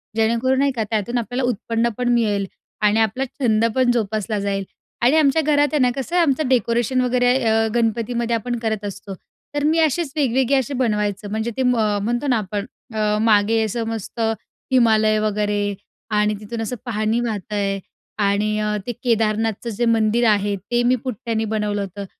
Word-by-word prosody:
जेणेकरून, 235 Hz, +4 st, +2 dB
नाही 280 Hz, 0 st, +3 dB
का, 230 Hz, -4 st, -2 dB
त्यातून 225 Hz, +2 st, -1 dB
आपल्याला 245 Hz, +2 st, -2 dB
उत्पन्न 230 Hz, +1 st, -1 dB
पण 245 Hz, -1 st, 0 dB
मिळेल 210 Hz, -4 st, +1 dB, 0.4 s
आणि 210 Hz, +1 st, +3 dB
आपला 225 Hz, +5 st, +1 dB
छंद 230 Hz, -4 st, +1 dB
पण 255 Hz, -2 st, +3 dB
जोपासला 215 Hz, -2 st, -1 dB
जाईल." 200 Hz, -1 st, -1 dB, 0.4 s
आणि 250 Hz, +6 st, +4 dB
आमच्या 300 Hz, 0 st, +4 dB
घरात, 290 Hz, -1 st, +3 dB
आहे 300 Hz, -, +2 dB
ना, 250 Hz, -, +4 dB
कसं 275 Hz, +6 st, -4 dB
आहे 355 Hz, -, +5 dB
आमचं 285 Hz, -2 st, +1 dB
डेकोरेशन 240 Hz, 0 st, +1 dB
वगैरे 245 Hz, 0 st, +2 dB
अ, 225 Hz, 0 st, +2 dB
गणपतीमध्ये 235 Hz, +1 st, 0 dB
आपण 240 Hz, +2 st, -2 dB
करत 220 Hz, -2 st, -2 dB
असतो. 200 Hz, 0 st, -7 dB, 0.4 s
तर 290 Hz, -, 0 dB
मी 315 Hz, +2 st, +3 dB
असेच 320 Hz, -1 st, +1 dB
वेगवेगळे 265 Hz, -1 st, +2 dB
असे 265 Hz, +1 st, -1 dB
बनवायचं 210 Hz, -5 st, -1 dB
म्हणजे 220 Hz, +2 st, -2 dB
ते 260 Hz, -, +1 dB
म 250 Hz, -, +3 dB, 0.3 s
म्हणतो 240 Hz, +6 st, -1 dB
ना 245 Hz, -3 st, +3 dB
आपण 205 Hz, 0 st, -3 dB, 0.3 s
अ, 210 Hz, -1 st, +1 dB
मागे 220 Hz, 0 st, +3 dB
असं 225 Hz, +2 st, -2 dB
मस्त 225 Hz, 0 st, -6 dB, 0.5 s
हिमालय 220 Hz, -3 st, +4 dB
वगैरे 205 Hz, -1 st, 0 dB, 0.4 s
आणि 210 Hz, 0 st, +2 dB
तिथून 225 Hz, +2 st, -6 dB
असं 225 Hz, +3 st, -3 dB
पाणी 220 Hz, -1 st, 0 dB
वाहत 215 Hz, -3 st, -4 dB
आहे 200 Hz, -1 st, -1 dB, 0.5 s
आणि 210 Hz, +1 st, +1 dB
अ, 210 Hz, 0 st, 0 dB
ते -, -, 0 dB
केदारनाथचं 225 Hz, -1 st, 0 dB
जे 230 Hz, +2 st, -1 dB
मंदिर 230 Hz, +1 st, +2 dB
आहे 205 Hz, -1 st, +1 dB
ते 240 Hz, +6 st, -1 dB
मी 250 Hz, +1 st, +3 dB
पुट्ट्याने 225 Hz, -3 st, -2 dB
बनवलं 210 Hz, -1 st, -1 dB
होतं 200 Hz, +1 st, -6 dB
225 Hz, 175 wpm, -21 LUFS, 210-245 Hz, 0.5 s, आहे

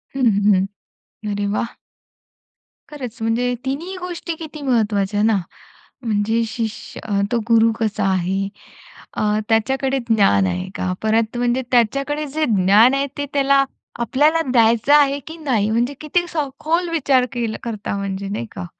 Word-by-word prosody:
हं, 265 Hz, -, -1 dB, 0.2 s
हं. 195 Hz, -2 st, +4 dB, 0.7 s
अरे 205 Hz, 0 st, -1 dB
वाह! 235 Hz, -, -3 dB, 1.1 s
खरंच 255 Hz, -5 st, -7 dB
म्हणजे 240 Hz, +2 st, 0 dB
तिन्ही 330 Hz, +8 st, -3 dB
गोष्टी 350 Hz, -2 st, -5 dB
किती 310 Hz, -2 st, -9 dB
महत्वाच्या 210 Hz, -5 st, +1 dB
ना. 220 Hz, -2 st, +3 dB, 0.7 s
म्हणजे 220 Hz, +1 st, +1 dB
शिष्य 220 Hz, -1 st, -5 dB, 0.3 s
तो 240 Hz, -, +2 dB
गुरु 230 Hz, 0 st, +5 dB
कसा 215 Hz, -3 st, 0 dB
आहे? 190 Hz, +2 st, 0 dB, 0.7 s
अ, -, -, -3 dB, 0.3 s
त्याच्याकडे 265 Hz, +4 st, +1 dB
ज्ञान 150 Hz, -, +4 dB
आहे 90 Hz, -, -3 dB
का? 185 Hz, -, -2 dB
परत 220 Hz, +2 st, +1 dB
म्हणजे 245 Hz, +1 st, +1 dB
त्याच्याकडे 275 Hz, +5 st, +1 dB
जे 310 Hz, -1 st, +2 dB
ज्ञान 205 Hz, +7 st, +5 dB
आहे 275 Hz, +1 st, 0 dB
ते 285 Hz, -, -2 dB
त्याला 275 Hz, 0 st, +4 dB, 0.4 s
आपल्याला 300 Hz, +7 st, +2 dB
द्यायचं 235 Hz, +3 st, +4 dB
आहे 285 Hz, -1 st, +5 dB
की 320 Hz, +1 st, -8 dB
नाही? 240 Hz, -9 st, 0 dB
म्हणजे 240 Hz, +5 st, +1 dB
किती 345 Hz, +3 st, 0 dB
सखोल 315 Hz, +4 st, -1 dB
विचार 275 Hz, -6 st, +2 dB
केलं 230 Hz, -3 st, -2 dB
करता 215 Hz, -3 st, -4 dB
म्हणजे 195 Hz, 0 st, -4 dB
नाही 120 Hz, -, -3 dB
का? 90 Hz, -, -5 dB
235 Hz, 140 wpm, -20 LUFS, 210-280 Hz, 1.1 s, गुरु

